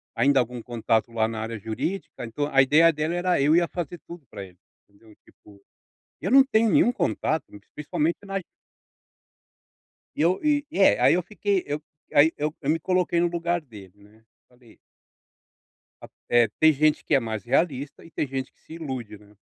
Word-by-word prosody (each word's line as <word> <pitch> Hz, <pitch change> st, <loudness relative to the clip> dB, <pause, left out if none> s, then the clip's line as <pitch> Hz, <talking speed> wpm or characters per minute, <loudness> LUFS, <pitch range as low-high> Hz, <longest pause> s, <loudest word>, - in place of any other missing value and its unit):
ainda 140 Hz, -1 st, +3 dB
algum 125 Hz, 0 st, -2 dB
contato 115 Hz, -1 st, -1 dB
lá 110 Hz, -1 st, +1 dB
na 110 Hz, -1 st, -5 dB
área 110 Hz, 0 st, -5 dB
jurídica, 115 Hz, -, -5 dB
então 145 Hz, +6 st, -3 dB
a 135 Hz, -, +6 dB
ideia 155 Hz, +5 st, +5 dB
dela 155 Hz, +2 st, -2 dB
era 175 Hz, +1 st, 0 dB
eu 145 Hz, +3 st, +3 dB
ia 170 Hz, 0 st, +3 dB
fazer 175 Hz, -1 st, -6 dB
tudo 170 Hz, -4 st, -11 dB
para 100 Hz, -, -7 dB
ele, 90 Hz, -2 st, -15 dB, 0.3 s
entendeu, 105 Hz, +1 st, -21 dB, 1.1 s
eu 190 Hz, -, -3 dB
não 270 Hz, +2 st, +7 dB
tenho 230 Hz, -4 st, +2 dB
nenhum 240 Hz, -, +4 dB
contato, 160 Hz, -, -1 dB, 0.3 s
principalmente 150 Hz, +2 st, -2 dB
na 195 Hz, 0 st, -2 dB, 1.8 s
E -, -, -5 dB
eu 175 Hz, +3 st, +2 dB
e 295 Hz, -1 st, +1 dB
é, 195 Hz, -, +4 dB
aí -, -, +5 dB
eu 180 Hz, -, 0 dB
fiquei 200 Hz, +1 st, -2 dB
eu 145 Hz, +1 st, -4 dB, 0.3 s
aí 150 Hz, +3 st, +5 dB
eu 150 Hz, +1 st, -2 dB
eu 145 Hz, -, -1 dB
me 160 Hz, -, +1 dB
coloquei 180 Hz, +1 st, 0 dB
no 175 Hz, -, +2 dB
lugar 170 Hz, 0 st, -1 dB
dele 105 Hz, -, -14 dB
né, 110 Hz, +2 st, -22 dB, 0.2 s
falei 125 Hz, -2 st, -22 dB, 1.2 s
A -, -, -12 dB, 0.2 s
é, 120 Hz, -2 st, +4 dB
tem 160 Hz, 0 st, +6 dB
gente 150 Hz, +1 st, +1 dB
que -, -, +1 dB
é 135 Hz, -, +4 dB
mais 110 Hz, -3 st, -5 dB
realista 140 Hz, +1 st, -1 dB
e 165 Hz, -, -15 dB
tem 150 Hz, -, -2 dB
gente 130 Hz, -1 st, -5 dB
que -, -, -39 dB
se 160 Hz, -, -13 dB
ilude, 130 Hz, -10 st, -6 dB
né. 105 Hz, 0 st, -21 dB
150 Hz, 180 wpm, -25 LUFS, 120-175 Hz, 1.8 s, não